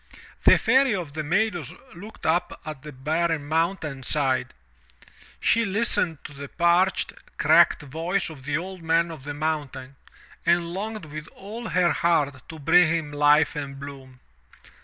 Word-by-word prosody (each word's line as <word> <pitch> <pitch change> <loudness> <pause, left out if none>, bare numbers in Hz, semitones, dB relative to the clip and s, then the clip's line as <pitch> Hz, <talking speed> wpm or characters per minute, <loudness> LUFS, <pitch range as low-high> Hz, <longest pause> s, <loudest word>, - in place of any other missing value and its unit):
The - - +8
Fairy 265 -3 +3
of 170 -7 -5
the 155 0 -3
Meadows 175 - -1 0.2
looked 205 +6 -11
up 175 +3 0
at 155 -4 -7
the 150 - -9
barren 155 +3 -1
mountain 160 -3 -1
side; 130 - 0 0.8
she 230 - +3
listened 195 -5 0
to - - -9
the 140 0 -8
parched, 175 +2 +2 0.2
cracked - - +5
voice 165 +6 -2
of 140 -4 -12
the 145 +1 0
Old 185 +1 -7
Man 165 +1 +1
of 150 -4 -10
the 145 0 -5
Mountain 145 -3 -4 0.5
and 170 0 +1
longed 215 0 -5
with 155 +1 -8
all 220 +4 -7
her 180 -1 +3
heart 145 -6 0
to 160 - -8
bring 165 +4 +5
him 160 -3 -1
life 150 +2 +4
and 140 -2 -5
bloom. 135 -2 -10
160 Hz, 155 wpm, -25 LUFS, 145-180 Hz, 0.8 s, The